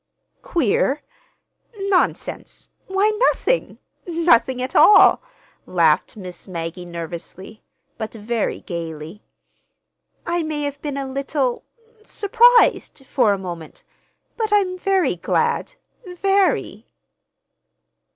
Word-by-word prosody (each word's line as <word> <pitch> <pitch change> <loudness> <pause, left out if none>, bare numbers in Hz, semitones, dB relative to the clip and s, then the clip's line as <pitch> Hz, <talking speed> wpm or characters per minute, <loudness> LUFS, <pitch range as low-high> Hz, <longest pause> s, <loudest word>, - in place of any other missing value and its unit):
"Queer? 285 - 0 0.7
Nonsense! 390 -2 -2 0.2
Why, 390 +3 +2 0.2
nothing—nothing 335 - 0
at 255 +1 -4
all," 420 - +7 0.5
laughed 165 +3 +2
Miss 180 -2 -9
Maggie 175 0 -6
nervously, 170 +5 -8 0.4
but 220 -1 -4
very 225 0 -3
gayly. 165 +1 -7 1.0
"I 345 0 -1
may 310 -2 -3
have 285 -1 -5
been 290 -2 -4
a 275 - -3
little—surprised, 420 - +1
for 250 -5 +2
a 200 - +1
moment; 175 -4 -8 0.5
but 440 -2 -2
I'm 390 -3 +2
very 370 - 0
glad—very." 390 - -1
275 Hz, 85 wpm, -21 LUFS, -, 1.0 s, all